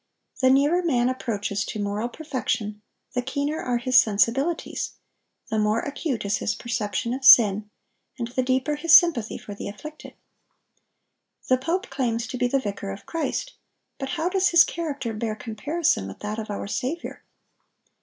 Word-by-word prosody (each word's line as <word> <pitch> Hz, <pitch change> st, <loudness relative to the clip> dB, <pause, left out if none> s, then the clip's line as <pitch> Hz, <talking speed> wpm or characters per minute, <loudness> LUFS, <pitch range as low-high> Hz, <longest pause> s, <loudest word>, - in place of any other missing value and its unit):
The 260 Hz, -, +5 dB
nearer 290 Hz, +7 st, +4 dB
man 255 Hz, -8 st, +2 dB
approaches 205 Hz, -5 st, -2 dB
to 215 Hz, -, -5 dB
moral 205 Hz, +3 st, -2 dB
perfection, 240 Hz, -8 st, -3 dB, 0.3 s
the 250 Hz, -, 0 dB
keener 285 Hz, +4 st, -2 dB
are 245 Hz, -1 st, 0 dB
his 255 Hz, +2 st, +5 dB
sensibilities, 245 Hz, +10 st, 0 dB, 0.6 s
the 220 Hz, -, +1 dB
more 215 Hz, +2 st, +2 dB
acute 285 Hz, -5 st, -3 dB
is 200 Hz, 0 st, +1 dB
his 215 Hz, -, -1 dB
perception 235 Hz, 0 st, -2 dB
of 265 Hz, +1 st, -5 dB
sin, 210 Hz, -4 st, +7 dB, 0.5 s
and 235 Hz, -3 st, -3 dB
the 255 Hz, +1 st, -1 dB
deeper 260 Hz, +3 st, 0 dB
his 330 Hz, +1 st, +6 dB
sympathy 315 Hz, -, +4 dB
for 205 Hz, -, -9 dB
the 200 Hz, -, -6 dB
afflicted. 305 Hz, +9 st, -10 dB, 1.3 s
The 255 Hz, -, +5 dB
pope 335 Hz, +8 st, -2 dB
claims 240 Hz, -4 st, -1 dB
to 255 Hz, -, -4 dB
be 250 Hz, -, +2 dB
the 275 Hz, -, +1 dB
vicar 200 Hz, -4 st, -5 dB
of 195 Hz, +1 st, -8 dB
Christ; 330 Hz, +9 st, -3 dB, 0.5 s
but 270 Hz, -1 st, -4 dB
how 325 Hz, +2 st, 0 dB
does 380 Hz, +1 st, +2 dB
his 340 Hz, -2 st, +7 dB
character 285 Hz, -8 st, -4 dB
bear 215 Hz, 0 st, -3 dB
comparison 230 Hz, -, -1 dB
with 95 Hz, -, -9 dB
that 210 Hz, +1 st, -4 dB
of 220 Hz, -, -6 dB
our 205 Hz, -, -4 dB
Saviour? 260 Hz, +11 st, -4 dB
250 Hz, 165 wpm, -24 LUFS, 215-295 Hz, 1.3 s, sin